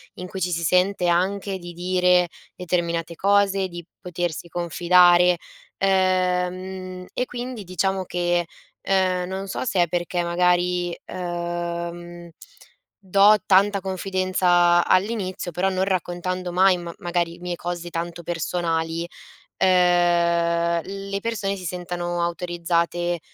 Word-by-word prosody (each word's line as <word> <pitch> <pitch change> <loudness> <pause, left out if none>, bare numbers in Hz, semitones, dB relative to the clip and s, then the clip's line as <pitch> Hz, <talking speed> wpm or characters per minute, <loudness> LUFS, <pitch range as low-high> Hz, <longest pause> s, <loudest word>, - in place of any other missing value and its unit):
in 180 0 -7
cui 190 +1 -7
ci 180 +1 0
si 170 0 -2
sente 180 +2 +2
anche 190 +3 0
di 175 -1 -9
dire 180 0 +2 0.3
determinate 170 -2 -2
cose, 195 -1 +2
di 175 0 -7 0.2
potersi 175 -2 -4
confidare, 175 +1 +4 0.4
uhm, 195 - +2 0.6
mhmm, 185 0 -7
e 250 - -1
quindi 245 -3 -6
diciamo 190 +1 -1
che, 175 -1 0 0.4
uhm, 185 -2 +2
non 190 +1 -5
so 195 - -3
se 185 -6 +2
è - - -1
perché 175 +1 -2
magari, 175 0 +1 0.2
uhm, - - -6 0.7
mhmm, 175 0 -9 0.7
do 200 +2 +5
tanta 200 +1 +4
confidenza 185 -2 +2
all'inizio, 185 -2 0
però 185 +4 0
non 190 0 0
raccontando 180 0 -2
mai 185 +1 +4
ma 170 -1 -7
magari 175 -1 -2
mie 175 0 -4
cose 175 0 -5
tanto 170 0 -5
personali, 165 0 -2 0.5
uhm, 170 -2 +3
le 195 0 -5
persone 205 -4 -2
si 185 -2 -8
sentano 175 0 -3
autorizzate, 175 0 -1
180 Hz, 125 wpm, -23 LUFS, 175-190 Hz, 0.7 s, do